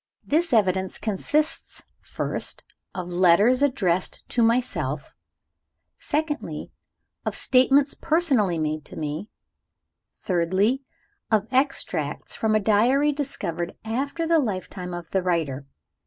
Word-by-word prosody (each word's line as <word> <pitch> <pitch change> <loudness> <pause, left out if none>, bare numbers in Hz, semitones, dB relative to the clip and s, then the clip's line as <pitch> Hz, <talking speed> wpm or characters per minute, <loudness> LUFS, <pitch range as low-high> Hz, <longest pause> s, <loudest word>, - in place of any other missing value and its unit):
This 330 +3 +1
evidence 190 -4 +2
consists 290 +9 -1 0.2
(first) - - -2 0.3
of 180 -1 -4
letters 185 +8 +4
addressed 190 -11 0
to 240 - 0
myself; 180 - 0 0.9
(secondly) 300 0 -3 0.5
of - - -2
statements 270 +2 +4
personally 275 - +2
made 155 -1 -2
to - - -10
me; 155 +6 -4 0.8
(thirdly) 190 +8 0 0.5
of 215 -2 +2
extracts 195 - 0
from 220 -1 +1
a - - +4
diary 240 +8 +3
discovered 195 - -4
after 280 +9 -2
the 330 0 +4
lifetime 185 -6 -3
of 175 -1 -8
the 190 - +1
writer. 155 -7 -1
210 Hz, 110 wpm, -24 LUFS, 175-275 Hz, 0.9 s, letters